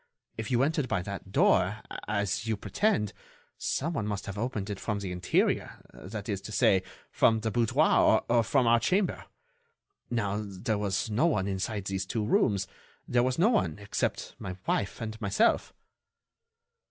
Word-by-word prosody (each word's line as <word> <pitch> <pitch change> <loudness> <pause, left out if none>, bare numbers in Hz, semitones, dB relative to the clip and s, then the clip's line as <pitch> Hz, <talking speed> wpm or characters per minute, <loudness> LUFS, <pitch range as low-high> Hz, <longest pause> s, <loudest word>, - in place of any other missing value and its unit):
If 110 -1 -5
you 125 0 +3
entered 150 -2 0
by 90 - -1
that 100 0 -7
door, 100 +2 +3 0.2
as 100 0 -1
you 110 -2 0
pretend, 105 - 0 0.5
some 165 +5 -1
one 110 -8 -2
must 100 -1 -3
have 95 - -5
opened 105 -2 -3
it 100 - -5
from 105 -2 -2
the 100 -2 -4
interior—that 95 +3 -2
is 100 -3 -2
to 110 - -8
say, 95 -2 +4 0.3
from 110 -1 +3
the 110 0 -1
boudoir 115 0 +4
or 120 0 +4
from 130 +2 +2
our 115 0 +5
chamber. 185 - 0 0.8
Now, 105 -3 -1
there 100 +1 -3
was 100 +1 -1
no 120 +11 +3
one 100 - +1
inside 100 +1 -2
these 95 -1 -2
two 110 0 -1
rooms... 100 -3 +2 0.4
there 120 - +3
was 130 +1 0
no 190 +7 +4
one 85 - +1
except 100 0 -2
my 90 -1 -6
wife 100 - -1
and 110 0 -5
myself." 100 -1 +2
105 Hz, 165 wpm, -29 LUFS, 100-115 Hz, 0.8 s, our